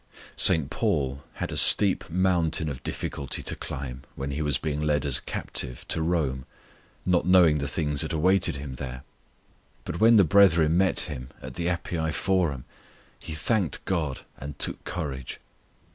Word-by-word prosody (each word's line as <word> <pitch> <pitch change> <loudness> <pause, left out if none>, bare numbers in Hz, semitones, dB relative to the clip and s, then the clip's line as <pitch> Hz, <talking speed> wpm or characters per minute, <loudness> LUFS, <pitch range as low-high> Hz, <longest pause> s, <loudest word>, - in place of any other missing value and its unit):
St. 80 -6 +3
Paul 70 0 -1
had - - -5
a - - -4
steep 100 -4 +6
mountain 85 -3 +1
of 70 -3 -7
difficulty 70 - -4
to - - -3
climb 65 -1 -7
when 70 +1 -5
he 70 +3 -3
was 75 -3 0
being 75 -1 -3
led 75 -1 0
as 70 -3 +3
a - - -17
captive 60 -3 -4
to 80 - -1
Rome, 75 -6 -1 0.6
not 90 -2 +1
knowing 85 -5 +5
the 70 - -2
things 75 -1 0
that 80 - -2
awaited 90 +1 +2
him 70 -1 -7
there; 65 -1 -6 0.8
but 85 - -5
when 115 +1 +6
the 100 - +7
brethren 85 -3 +4
met 95 +1 +2
him 70 -6 -6
at 65 0 -9
the 85 +3 -3
Appii 85 -2 -2
Forum 85 -9 0 0.5
he 80 - -7
thanked 95 +1 -1
God 80 -8 -2 0.2
and 70 +2 -8
took - - 0
courage. 70 -7 -5
80 Hz, 165 wpm, -26 LUFS, 70-90 Hz, 0.8 s, the